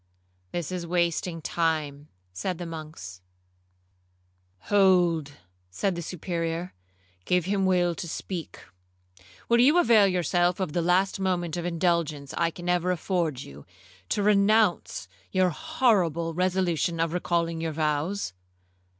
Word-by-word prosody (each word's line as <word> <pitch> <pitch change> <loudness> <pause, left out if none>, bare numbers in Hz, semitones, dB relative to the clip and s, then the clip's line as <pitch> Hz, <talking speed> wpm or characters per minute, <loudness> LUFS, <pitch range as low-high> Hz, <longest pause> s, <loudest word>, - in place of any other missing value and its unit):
'This 175 -1 -3
is 180 -2 -4
wasting 170 -1 -1
time,' 155 -4 -1 0.3
said 180 - -3
the 175 - -6
monks. 155 - -8 1.4
'Hold, 175 - +3 0.4
said 190 - -1
the 170 - -4
Superior; 170 0 -3 0.5
'give 180 -2 +2
him 195 0 +1
leave 175 -2 +2
to 175 - -5
speak. 170 0 -6 0.9
Will 235 0 +4
you 285 +8 +5
avail 230 - +6
yourself 175 0 +1
of 185 -6 -2
the 175 - +1
last 185 +3 +2
moment 175 -4 -1
of 175 -1 -4
indulgence 170 -5 -1
I 170 - +1
can 175 +1 -9
ever 180 0 +1
afford 170 -6 -1
you, 70 +1 -12 0.5
to 205 - 0
renounce 205 - +2 0.2
your 185 -1 +2
horrible 185 - +1
resolution 180 -2 0
of 165 0 0
recalling 170 -2 -1
your 165 -1 -2
vows?' 155 - -1
175 Hz, 125 wpm, -26 LUFS, 165-185 Hz, 1.4 s, avail